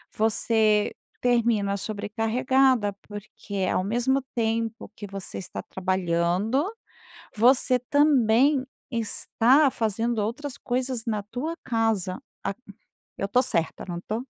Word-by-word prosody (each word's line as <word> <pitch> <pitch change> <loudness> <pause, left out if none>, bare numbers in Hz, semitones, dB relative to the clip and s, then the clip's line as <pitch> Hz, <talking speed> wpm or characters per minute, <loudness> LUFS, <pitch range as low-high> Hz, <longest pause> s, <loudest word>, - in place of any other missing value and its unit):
você 215 -1 +2 0.3
termina 230 -5 +2
sobrecarregada 225 +3 +1
porque 205 -1 -5
ao - - +1
mesmo 245 +6 +1
tempo 225 -1 -1
que 205 - -7
você 195 -1 -7
está 185 - -6
trabalhando 185 - 0 0.7
você 250 +3 +4
também 270 0 +3 0.3
está 245 +4 +2
fazendo 225 +1 -1
outras 250 +7 -3
coisas 250 -1 -2
na 215 -3 -1
tua 255 +10 -4
casa, 225 -6 0 0.2
a 195 - -1 0.6
eu - - -1
estou 250 +5 +3
certa 165 -10 -1
não 175 -1 -4
estou? 220 +7 -4
225 Hz, 110 wpm, -26 LUFS, 205-250 Hz, 0.7 s, você